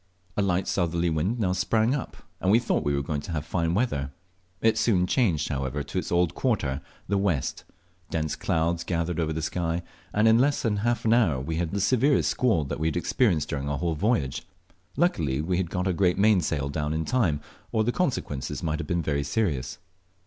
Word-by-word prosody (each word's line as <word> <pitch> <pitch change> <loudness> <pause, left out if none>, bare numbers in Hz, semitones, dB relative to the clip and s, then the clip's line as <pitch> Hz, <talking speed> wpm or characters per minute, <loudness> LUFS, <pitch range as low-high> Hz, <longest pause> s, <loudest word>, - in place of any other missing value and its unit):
A - - +1
light 95 -1 +1
southerly 85 -2 0
wind 85 +10 0
now 95 -4 +1
sprung 110 +6 +2
up, 140 - -4 0.2
and 95 - 0
we 105 - +6
thought 120 - 0
we 70 0 +1
were 70 - -1
going 75 0 -2
to 80 - -7
have 75 -2 -2
fine 85 +1 0
weather. 75 - 0 0.5
It 110 +2 +3
soon 95 -7 +3
changed, 90 - +1
however, 70 0 -2
to 75 +6 -3
its - - -5
old 85 -1 +2
quarter, 80 - 0 0.3
the 100 -1 +1
west; 90 -9 -1 0.4
dense 80 -2 -1
clouds 85 +1 0
gathered 85 -1 -1
over 80 -1 0
the 80 0 -3
sky, 85 +1 -1 0.3
and 105 +2 +3
in 110 +1 +6
less 140 +3 +2
than 110 -4 +1
half 120 +3 0
an 110 - +4
hour 100 - +3
we 80 +5 -3
had 85 -1 -1
the 100 - -2
severest 125 - +3
squall 90 - +2
we 80 - +1
had 80 - -1
experienced 85 - +1
during 70 0 -2
our 70 - -1
whole 85 +1 -1
voyage. 80 - 0 0.6
Luckily 80 - +1
we 90 +4 0
got 90 +1 -2
our 95 - +1
great 90 0 +2
mainsail 90 -9 +2
down 75 +1 -2
in 80 0 -1
time, 95 - +1 0.3
or 110 - +2
the 120 - +1
consequences 120 - -2
might 80 0 -1
have 80 - -4
been 75 -4 0
serious. 75 - -1
85 Hz, 200 wpm, -26 LUFS, 75-105 Hz, 0.6 s, we